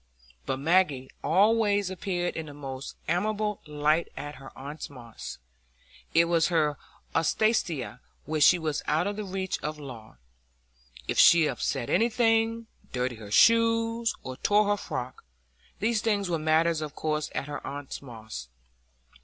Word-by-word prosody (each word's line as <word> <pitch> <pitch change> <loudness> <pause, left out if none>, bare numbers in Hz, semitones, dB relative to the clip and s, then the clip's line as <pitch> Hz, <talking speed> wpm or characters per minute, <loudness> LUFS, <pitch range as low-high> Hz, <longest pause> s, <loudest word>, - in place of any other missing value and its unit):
But 130 - 0
Maggie 145 -3 +2
always 205 +1 +3
appeared 180 -2 -2
in 160 -1 -4
the 145 - -10
most 135 -2 -7
amiable 210 +4 0
light 150 +2 +1
at 145 -1 -6
her 135 0 -11
aunt 145 +3 -7
Moss's; 120 -5 -9 0.8
it 165 +1 +6
was 170 -1 +3
her 155 -5 +1 0.3
Alsatia, 165 - +1 0.3
where 155 0 -2
she 180 - +7
was 155 -3 -2
out 155 +4 +2
of 205 0 -2
the 210 - -4
reach 190 -1 -3
of 150 0 -4
law,—if 60 - -10
she 170 -2 +8
upset 120 -3 -1
anything, 225 0 +2 0.3
dirtied 125 -2 -2
her 105 -2 -9
shoes, 230 - +4
or 130 0 -6
tore 205 +6 +3
her 205 - +2
frock, 125 -9 -5 0.5
these 220 0 +1
things 200 -5 0
were 165 - 0
matters 160 +1 +2
of 150 -1 -5
course 155 -1 -1
at - - -1
her 145 - -6
aunt 140 -1 -6
Moss's. 110 - -9
155 Hz, 145 wpm, -28 LUFS, 135-205 Hz, 0.8 s, she